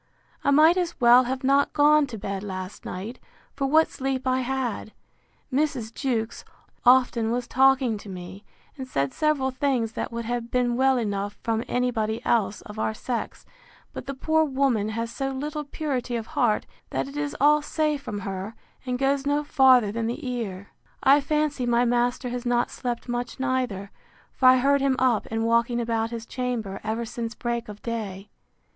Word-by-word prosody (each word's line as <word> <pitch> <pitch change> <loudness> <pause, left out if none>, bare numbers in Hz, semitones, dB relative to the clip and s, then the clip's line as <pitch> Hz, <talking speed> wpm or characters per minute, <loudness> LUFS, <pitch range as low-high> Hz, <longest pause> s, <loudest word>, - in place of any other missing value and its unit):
I - - +2
might 310 +5 +6
as 345 -4 -2
well 245 0 +7
have 260 +2 -3
not 275 +2 +3
gone 295 0 +5
to 235 -4 -7
bed 200 -1 -4
last 185 -1 -7
night, 215 +7 -6 0.3
for 275 - -1
what 315 +3 +4
sleep 265 -1 -3
I 255 0 +2
had. 250 -4 -3 0.6
Mrs. 265 -6 0
Jewkes 235 -4 -2 0.4
often 245 -2 +4
was 240 +1 -1
talking 260 -4 +3
to 205 - -11
me, 185 +2 -8 0.3
and 265 -2 -7
said 140 - -1
several 300 -4 +1
things 255 -4 0
that - - -4
would 235 0 -4
have 240 0 -3
been 245 -1 +1
well 265 +1 +3
enough 205 -3 -2
from 225 0 0
any 250 0 0
body 220 -1 -1
else 210 -4 +1
of 210 +1 -9
our 220 - -1
sex; 240 +1 -4 0.5
but - - -7
the 275 - -4
poor 315 +4 +2
woman 265 -7 +1
has 230 +1 -3
so 270 -1 -2
little 295 +3 -4
purity 275 -4 -3
of 225 -2 -3
heart, 220 -3 +2 0.2
that - - -2
it 275 - -10
is 290 -1 -3
all 300 +2 +5
say 305 0 0
from 250 -8 -6
her, 195 +3 -5 0.3
and 250 0 -1
goes 275 +1 +1
no 290 +1 +1
farther 260 -7 +5
than 225 +1 -2
the 240 +3 -4
ear. 205 -6 -4 0.3
I 280 +2 +6
fancy 295 -3 0
my 240 +1 +3
master 245 +1 0
has 245 0 -4
not 240 -1 +1
slept 240 -1 -4
much 245 +1 -4
neither; 255 -7 -2 0.4
for 255 - +3
I 255 0 +8
heard 280 +2 +3
him 270 -1 +2
up, 250 -5 +2
and 225 0 -1
walking 235 +1 +2
about 230 -1 -1
his 230 -1 -6
chamber, 235 -6 -3
ever 225 +2 -2
since 230 0 -5
break 235 -1 -3
of 210 0 -10
day. 210 -4 -5
245 Hz, 185 wpm, -25 LUFS, 225-270 Hz, 0.6 s, I